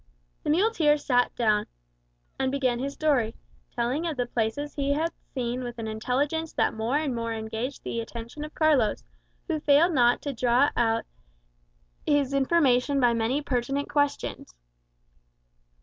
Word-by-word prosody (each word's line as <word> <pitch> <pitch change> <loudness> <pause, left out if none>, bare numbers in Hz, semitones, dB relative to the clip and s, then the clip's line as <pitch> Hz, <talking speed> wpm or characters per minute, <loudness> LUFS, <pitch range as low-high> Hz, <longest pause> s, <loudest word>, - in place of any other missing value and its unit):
The - - -4
muleteer 325 -3 +3
sat 245 -4 +1
down, 215 -3 +2 0.7
and 260 0 +1
began 260 -3 0
his 275 +2 -3
story, 270 -8 +1 0.4
telling 255 +8 -1
of 315 -4 -3
the 245 - 0
places 240 +5 -2
he 280 -1 0
had 320 +3 0 0.2
seen 250 0 -2
with 240 -1 -6
an 225 -1 -4
intelligence 275 +9 -1
that - - +1
more 225 +5 0
and 300 -4 -1
more 230 -1 -2
engaged 225 +4 -4
the 230 - -3
attention 235 +5 -7
of 305 - -9
Carlos, 290 -9 +2 0.4
who 320 -4 -1
failed 300 +4 +4
not 245 -3 +4
to 285 - -3
draw 245 +3 +3
out 230 -1 +1 1.0
his 285 -2 +1
information 275 -1 +3
by 245 -2 +4
many 230 +6 0
pertinent 275 +2 -2
questions. 285 - -1
260 Hz, 150 wpm, -26 LUFS, 235-290 Hz, 1.0 s, failed